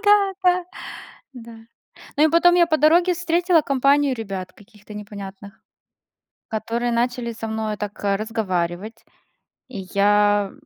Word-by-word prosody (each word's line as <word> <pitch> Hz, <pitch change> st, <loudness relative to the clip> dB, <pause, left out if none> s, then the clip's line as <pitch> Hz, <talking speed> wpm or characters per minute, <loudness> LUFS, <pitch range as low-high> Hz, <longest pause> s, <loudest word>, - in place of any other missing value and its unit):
Да, 410 Hz, -1 st, +4 dB
да. 360 Hz, -1 st, +3 dB, 0.7 s
Да. 235 Hz, -2 st, -11 dB, 0.6 s
Ну, 300 Hz, -, +4 dB
и -, -, +5 dB
потом 345 Hz, +2 st, +5 dB
я 350 Hz, -1 st, +5 dB
по 315 Hz, -2 st, +1 dB
дороге 340 Hz, +5 st, +4 dB
встретила 345 Hz, 0 st, +2 dB
компанию 275 Hz, 0 st, +2 dB
ребят 195 Hz, -5 st, -6 dB
каких-то 210 Hz, +1 st, -16 dB
непонятных, 200 Hz, -1 st, -10 dB, 0.9 s
которые 230 Hz, +2 st, -2 dB
начали 240 Hz, 0 st, -1 dB
со 225 Hz, 0 st, -6 dB
мной 220 Hz, -1 st, -3 dB
так, 205 Hz, 0 st, -7 dB
э, 200 Hz, -1 st, +2 dB
разговаривать. 210 Hz, -1 st, -3 dB, 0.6 s
И 235 Hz, -7 st, -7 dB
я, 205 Hz, 0 st, +3 dB
230 Hz, 130 wpm, -22 LUFS, 205-310 Hz, 0.9 s, и